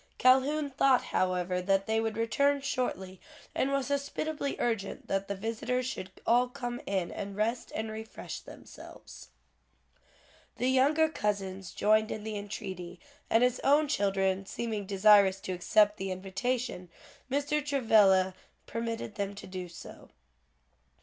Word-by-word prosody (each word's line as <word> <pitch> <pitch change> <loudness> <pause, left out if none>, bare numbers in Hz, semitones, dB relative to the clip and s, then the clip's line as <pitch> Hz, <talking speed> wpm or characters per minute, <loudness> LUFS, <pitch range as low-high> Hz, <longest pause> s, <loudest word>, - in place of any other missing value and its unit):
Calhoun 280 +3 +3
thought 265 -1 +3
however 180 0 0
that 195 +1 +1
they 220 0 +1
would 225 -1 -2
return 280 +5 +2
shortly, 190 -9 -3 0.3
and 270 - 0
was 275 -1 0
hospitably 280 +1 -2
urgent 225 -5 -2
that 195 0 -1
the 200 - -3
visitors 230 +5 -2
should 195 -6 -5 0.2
all 245 +2 +4
come 245 -2 -5
in 190 -3 -1
and 200 -1 -6
rest 225 +4 -1
and 220 0 -3
refresh 220 0 -7
themselves. - - -12 1.3
The 250 - +1
younger 290 +5 +4
cousins 195 - -3
joined 215 +1 +3
in 215 - -5
the 220 0 -4
entreaty, 190 -4 -6 0.3
and 225 +2 +4
his 250 0 +2
own 295 +2 +4
children 195 -5 0
seeming 215 -4 -4
desirous 200 -1 +5
to - - -5
accept 210 +3 +3
the 195 -1 -4
invitation, 195 +2 -3 0.4
Mr. 290 +2 0
Travilla 210 -9 +4 0.3
permitted 230 -1 -4
them 200 -1 -3
to 200 - -9
do 185 -1 -6
so. 170 - -12
220 Hz, 135 wpm, -30 LUFS, 195-255 Hz, 1.3 s, desirous